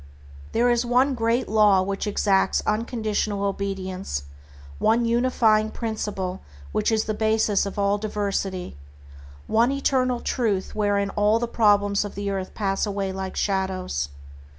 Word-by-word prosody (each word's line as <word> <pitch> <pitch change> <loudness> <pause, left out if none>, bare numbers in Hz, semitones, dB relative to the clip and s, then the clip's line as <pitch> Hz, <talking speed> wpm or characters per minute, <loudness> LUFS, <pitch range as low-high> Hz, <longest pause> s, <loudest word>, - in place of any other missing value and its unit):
There 245 +1 +3
is 240 0 +2
one 250 +3 +2
Great 235 +1 0
Law 210 -3 +4
which 195 +2 -3
exacts 200 -2 +2
unconditional 215 -2 -1
obedience, 195 - -3 0.6
one 235 +2 +3
unifying 230 -2 +2
principle 210 -5 -4 0.3
which - - 0
is 220 -1 +2
the 215 - -2
basis 220 -2 +1
of 200 - -7
all 200 0 +1
diversity, 200 - -3 0.7
one 235 +4 +3
eternal 255 -3 +1
Truth 210 -8 -1
wherein 205 -2 0
all 210 +2 +3
the 240 +1 -1
problems 205 -3 +3
of 205 -2 -8
earth 195 -2 -3
pass 195 0 0
away 195 -1 -2
like 190 0 -5
shadows. 185 - -1
205 Hz, 130 wpm, -24 LUFS, 195-225 Hz, 0.7 s, Law